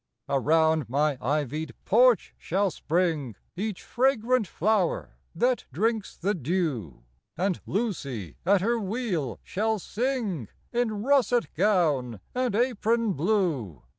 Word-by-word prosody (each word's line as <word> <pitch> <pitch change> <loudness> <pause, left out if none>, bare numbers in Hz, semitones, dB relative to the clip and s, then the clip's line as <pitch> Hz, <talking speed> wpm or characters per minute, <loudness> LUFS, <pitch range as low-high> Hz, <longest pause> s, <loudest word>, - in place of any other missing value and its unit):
Around 160 +1 +2
my 145 +3 +2
ivy'd 145 0 -2
porch 240 -1 +4
shall 195 +2 0
spring 160 - -1 0.2
Each 205 0 -3
fragrant 250 -3 +2
flower 200 +1 0 0.2
that 245 +7 +1
drinks 215 - -1
the 200 +4 0
dew; 145 - -2 0.3
And 185 +1 0
Lucy, 140 - -3
at 195 +1 +4
her 235 +4 +1
wheel, 195 - -2
shall 220 +3 0
sing 215 - -2 0.3
In 220 -4 0
russet 250 -3 +2
gown 150 - +1
and 250 -4 0
apron 230 -2 +1
blue. 155 - 0
190 Hz, 110 wpm, -27 LUFS, 150-225 Hz, 0.3 s, porch